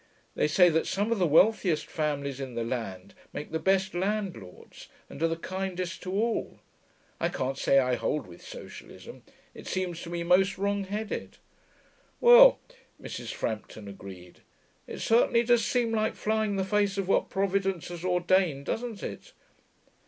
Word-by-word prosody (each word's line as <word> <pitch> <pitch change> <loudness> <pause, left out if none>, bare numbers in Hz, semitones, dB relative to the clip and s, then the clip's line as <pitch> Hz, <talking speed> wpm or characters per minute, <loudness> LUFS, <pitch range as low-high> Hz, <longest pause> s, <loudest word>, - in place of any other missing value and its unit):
They - - +1
say 175 +4 +5
that 160 0 0
some 205 +3 -1
of 230 - +1
the 180 - +3
wealthiest 175 0 +3
families 140 -3 -3
in 130 -3 -6
the 115 - -1
land 115 -6 -5 0.2
make 150 - -6
the 160 - -1
best 190 +2 +1
landlords 185 - -4 0.2
and - - -11
are 165 - +3
the 165 - -1
kindest 185 +1 -4
to 185 - -5
all. 225 +4 -1 0.6
I - - +1
can't 130 +1 -2
say 135 - +2
I 130 -2 +3
hold 140 +4 -1
with 85 -2 -14
socialism. - - -11 0.3
It - - -11
seems 180 -3 -3
to 170 - -8
me 170 0 -3
most 190 +3 +3
wrong 200 0 -1
headed.' 210 +2 -5 0.8
'Well,' - - +8 0.4
Mrs. - - -6
Frampton 110 -1 -5
agreed, 95 -3 -11 0.5
'it - - -7
certainly 235 +1 +3
does 240 -1 +3
seem 240 0 0
like 215 -1 0
flying 220 0 0
in 200 - -2
the 190 - +1
face 205 0 +1
of 195 -2 -2
what - - +2
Providence 195 -2 -1
has 175 -1 -7
ordained, 180 -5 +1
doesn't 225 0 -4
it? - - -7
185 Hz, 165 wpm, -28 LUFS, 150-205 Hz, 0.8 s, Well